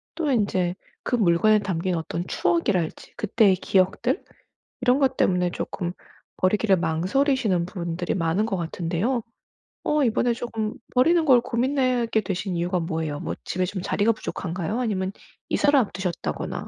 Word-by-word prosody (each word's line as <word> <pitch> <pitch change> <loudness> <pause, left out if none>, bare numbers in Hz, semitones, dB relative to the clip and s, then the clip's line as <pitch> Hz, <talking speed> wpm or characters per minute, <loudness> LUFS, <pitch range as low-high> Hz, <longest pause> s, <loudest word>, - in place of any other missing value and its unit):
또 320 -4 -1
인제 190 -6 +1 0.3
그 245 - 0
물건에 215 +1 +4
담긴 185 -2 -1
어떤 165 +2 -3
추억이랄지, 175 0 0
그때의 210 -2 +3
기억들 195 - +1 0.6
이런 250 +2 +3
것 265 -2 +2
때문에 180 -1 +2
쪼끔 175 -1 -4 0.5
버리기를 195 +1 +3
망설이시는 185 - +1
분들이 175 -2 -3
많은 170 +4 +1
것 195 -4 -2
같은데요. 175 +8 -1 0.6
어 300 -1 +2
이번에 240 0 +2
쪼금 225 -2 -4 0.2
버리는 325 +6 +4
걸 250 -4 +6
고민하게 245 -3 +1
되신 190 -1 -3
이유가 175 +1 0
뭐예요? 160 -3 -3
뭐 - - -4
집에 185 0 -1
좀 185 0 -4
자리가 215 +4 +2
부족한가요? 185 +2 -4
아니면 195 -5 -1 0.4
이사를 290 -1 +3
앞두셨다거나 190 -6 -3
195 Hz, 340 characters per minute, -24 LUFS, 175-235 Hz, 0.6 s, 걸